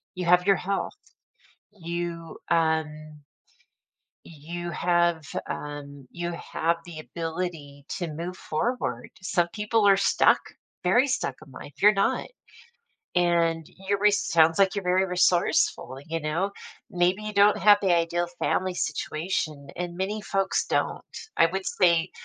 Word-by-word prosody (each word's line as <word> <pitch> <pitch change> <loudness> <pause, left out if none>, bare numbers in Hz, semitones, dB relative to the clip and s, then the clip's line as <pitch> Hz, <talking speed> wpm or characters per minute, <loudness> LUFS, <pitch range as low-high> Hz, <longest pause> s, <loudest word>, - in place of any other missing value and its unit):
You 180 -1 -3
have 180 +1 +4
your 195 -2 +5
health. 195 +1 -3 0.7
You, 170 -3 -5
um 155 -2 0 1.1
You 170 +3 -7
have, 170 -1 +1 0.3
um, 145 -2 -7
you 175 0 -4
have 170 0 -1
the 170 -3 -9
ability 160 -4 -5
to 175 -3 -3
move 170 +4 -5
forward, 240 +11 -2
some 175 -2 0
people 210 0 +1
are 195 -1 +6
stuck, 195 - +4 0.4
very 240 +9 +4
stuck 255 - -1
in 135 - -16
life. 140 +2 -11
You're 210 +1 +8
not. 195 0 0 0.9
And 170 -2 +2 0.2
your 200 0 +2
re 210 +1 +5
sounds 165 -5 +3
like 195 -1 +4
you're 200 -2 -3
very 185 +1 +2
resourceful, 180 -6 +1
you 165 0 -3
know. 160 +6 -1 0.4
Maybe 180 +3 +1
you 215 0 -5
don't 205 0 +5
have 205 +2 +6
the 190 -3 +3
ideal 170 +1 0
family 185 -1 0
situation 155 -2 -3
and 175 0 -5
many 200 +4 -2
folks 195 -1 -1
don't. - - 0 0.4
I - - +7
would 190 +3 -4
say 170 -2 +2
175 Hz, 140 wpm, -26 LUFS, 160-190 Hz, 1.1 s, You're